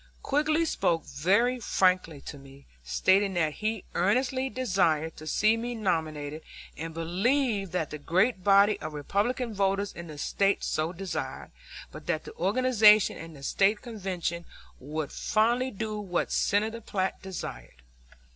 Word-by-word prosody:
Quigg 295 +2 0 0.2
spoke 170 - 0
very 210 - +1
frankly 185 -8 +1
to 145 - -9
me, 135 0 -15 0.2
stating 190 - +2
that 160 -3 +1
he 215 +1 -3
earnestly 255 +7 +1
desired 175 - 0
to 155 - -10
see 215 +8 +3
me 240 +1 -4
nominated 155 -7 -2 0.3
and 165 0 -6
believed 195 - 0
that 170 -4 -2
the 150 - -6
great 185 +6 +1
body 200 +1 +5
of 155 0 -6
Republican 215 - -1
voters 195 0 0
in 170 0 -8
the 155 -2 -9
State 195 +6 +1
so 155 +2 -1
desired, 185 +1 -5 0.4
but - - -11
that - - -1
the 445 - -10
organization 215 -1 +5
and 165 0 -9
the 140 - -13
State 200 +8 +2
Convention 185 -7 -4 0.4
would 150 +2 -4
finally 240 +4 +1
do 215 -1 -4
what 185 -4 -2
Senator 220 +3 +1
Platt 190 -3 -2
desired. 65 - -8
195 Hz, 145 wpm, -28 LUFS, 160-220 Hz, 0.4 s, body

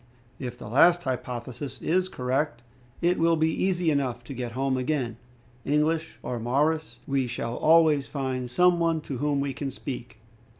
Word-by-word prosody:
If 125 -2 -5
the - - -9
last 170 +9 +5
hypothesis 130 +1 -4
is 185 +3 +1
correct, 130 -2 -1 0.4
it 175 +1 +3
will 165 0 +4
be 160 0 +2
easy 180 -3 +1
enough 130 -4 -1
to 130 - -8
get 120 -2 -5
home 135 +1 0
again. 130 -3 -1 0.5
English 155 +3 0
or 125 -1 -3
Maoris, 140 +2 0
we 135 -2 0
shall 115 -1 -3
always 155 -3 +4
find 130 -3 -3
some 180 +7 +4
one 165 -1 +1
to 135 -4 -5
whom 145 0 +1
we 140 -1 -1
can 140 +1 -4
speak. 125 -4 -7
140 Hz, 165 wpm, -27 LUFS, 125-160 Hz, 0.5 s, last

